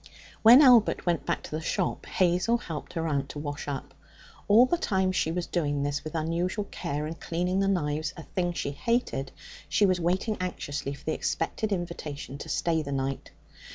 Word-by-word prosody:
When 240 +6 +9
Albert 245 -5 +5
went 170 -3 0
back - - -1
to - - -9
the 155 +1 -3
shop, 180 +3 -2
Hazel 185 +6 +2
helped 165 -10 -7
her 165 -2 -2
aunt 140 -3 -1
to - - -7
wash 145 0 -5
up. 135 -1 -5 0.5
All 220 +5 +7
the 300 - +1
time 190 - +1
she 160 -3 0
was 175 +1 -2
doing 145 -5 -1
this, 145 0 -2
with 155 +1 -7
unusual 170 +6 -1
care, 150 -4 -3
and 160 +2 -6
cleaning 180 +3 -1
the 195 - +2
knives 155 -5 0
a 165 - -7
thing 175 +1 -2
she 140 - -3
hated 145 - -1 0.4
she 185 +6 +4
was 185 -2 +2
waiting 185 +6 0
anxiously 145 -6 -4
for - - -17
the 160 - 0
expected 220 -1 -2
invitation 155 -7 -4
to - - -7
stay 165 -2 +1
the 140 -2 -5
night. 135 0 -2
170 Hz, 190 wpm, -28 LUFS, 145-190 Hz, 0.5 s, When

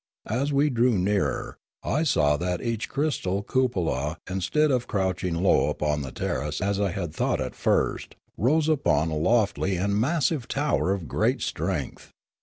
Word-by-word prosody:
As 135 +6 0
we 145 +1 +2
drew 120 -2 +2
nearer, 100 +2 -1 0.2
I 150 - 0
saw 75 - +3
that 90 +2 -2
each 115 -2 -2
crystal 115 -10 -1
cupola, 85 - 0
instead 95 - +1
of 125 -2 0
crouching 95 -4 -1
low 90 +3 +3
upon 75 -1 -1
the 65 -2 -6
ter 65 - -2
race 75 0 -3
as 100 +1 0
I 100 -1 +1
had 85 -3 -4
thought - - 0
at - - -3
first, - - 0 0.2
rose 150 +8 +2
upon 135 - +2
a - - -1
lofty 100 +2 +1
and 100 +3 0
massive 140 +2 +1
tower 140 -9 0
of 95 -5 -2
great - - 0
strength. - - -3
100 Hz, 165 wpm, -26 LUFS, 85-130 Hz, 0.2 s, saw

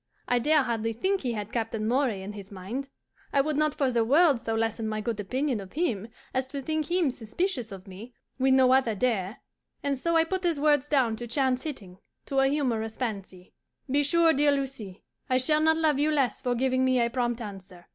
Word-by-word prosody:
I 245 - +2
dare 300 +3 +3
hardly 225 -2 -1
think 380 - 0
he 245 -3 -2
had 210 -1 -5
Captain 225 -2 -2
Moray 240 -5 +1
in 205 +2 -6
his 200 -1 -10
mind. 220 +9 -6 0.4
I 280 - +4
would 305 +2 -1
not 305 0 +1
for 270 -3 +1
the 235 -2 +2
world 285 +1 +4
so 225 -1 -2
lessen 225 0 -1
my 215 0 -2
good 220 0 -3
opinion 255 +4 -1
of 195 -1 -10
him 235 - -1 0.3
as 260 0 -1
to 280 +1 -5
think 310 +1 -2
him 345 -5 +2
suspicious 245 - -3
of 190 -1 -9
me 200 +6 -10 0.3
when 265 0 +3
no 260 -1 +5
other 260 -5 +2
dare; 210 -2 -1 0.4
and 280 -2 -1
so 335 +4 0
I 325 - +5
put 375 +3 -3
his 335 -4 +1
words 295 -1 +2
down 250 -6 +2
to 240 - -6
chance 255 +1 +1
hitting, 195 -12 -7 0.3
to 275 - 0
a 270 - +4
humorous 235 -6 -1
fancy. 195 -6 -5 0.4
Be 285 +2 +3
sure, 330 +3 +4
dear 290 0 +3
Lucie, 265 -9 -4 0.3
I 255 - +3
shall 305 +4 +2
not 320 0 +4
love 310 -3 +2
you 300 +2 +2
less 275 -7 0
for 245 -1 0
giving 255 +1 +1
me 255 -1 +3
a 235 - +3
prompt 240 -1 -1
answer. 195 -5 -9
255 Hz, 215 wpm, -27 LUFS, 220-290 Hz, 0.4 s, no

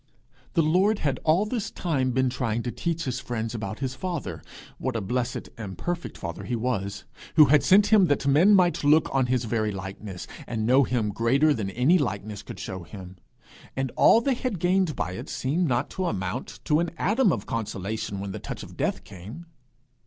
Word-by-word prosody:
The 165 - +3
Lord 185 +7 +3
had 140 -7 -1
all 165 +6 +3
this 215 -1 -3
time 140 -7 -1
been 130 0 +1
trying 120 -2 -1
to 120 - -3
teach 165 +3 -2
his 130 -3 -2
friends 115 -3 -4
about 110 -2 -4
his 130 -1 -2
father 170 +3 -4 0.4
what 130 -2 -2
a - - +1
blessed 120 +4 -3
and 95 -5 -6
perfect 175 - -4
father 85 -2 -6
he 125 - -2
was, 100 -4 -2 0.3
who 155 -2 +9
had 150 - +6
sent 205 +3 +5
him 205 -3 +7
that 145 -2 0
men 160 +9 +6
might 180 -4 +3
look 150 +2 +4
on 135 -2 +2
his 125 -1 +1
very 110 -1 0
likeness, 95 -1 -7 0.2
and 110 -2 -2
know 130 +3 +5
him 120 -4 0
greater 135 +8 +3
than 105 -7 -3
any 130 - +3
likeness 105 -5 -3
could - - -9
show 95 -1 -5
him; 95 +1 -10 0.6
and 135 -1 -2
all 230 - +6
they 270 +2 +1
had 250 -4 -3
gained 180 -1 +1
by 90 - -2
it 90 - -7
seemed 160 +7 0
not 125 0 0
to 185 - -2
amount 95 - -4
to 150 -1 +3
an 170 0 0
atom 215 +1 +3
of 110 -7 -2
consolation 105 -2 -3
when 100 0 -4
the - - -6
touch - - -6
of - - -11
death - - -1
came. 105 - -10
130 Hz, 200 wpm, -26 LUFS, 110-165 Hz, 0.6 s, who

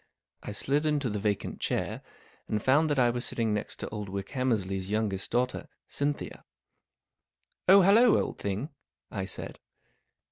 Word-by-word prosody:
I - - -6
slid 140 +9 0
into 145 -6 0
the 105 - -2
vacant 100 -1 -2
chair, - - -2 0.5
and 105 - 0
found 145 +8 +3
that 145 - +1
I 120 -2 +4
was 120 0 -2
sitting 115 -3 0
next 105 - -3
to - - -4
old 105 -2 -5
Wickhammersley's 100 -2 -2
youngest 105 -3 -1
daughter, 125 +1 -1 0.2
Cynthia. 145 0 -3 0.6
" - - -53
Oh, 195 +1 +9
hallo, 220 +5 +6
old - - -3
thing," 100 +9 -3 0.4
I 95 -2 -3
said. 95 - -6
115 Hz, 150 wpm, -29 LUFS, 100-145 Hz, 0.6 s, Oh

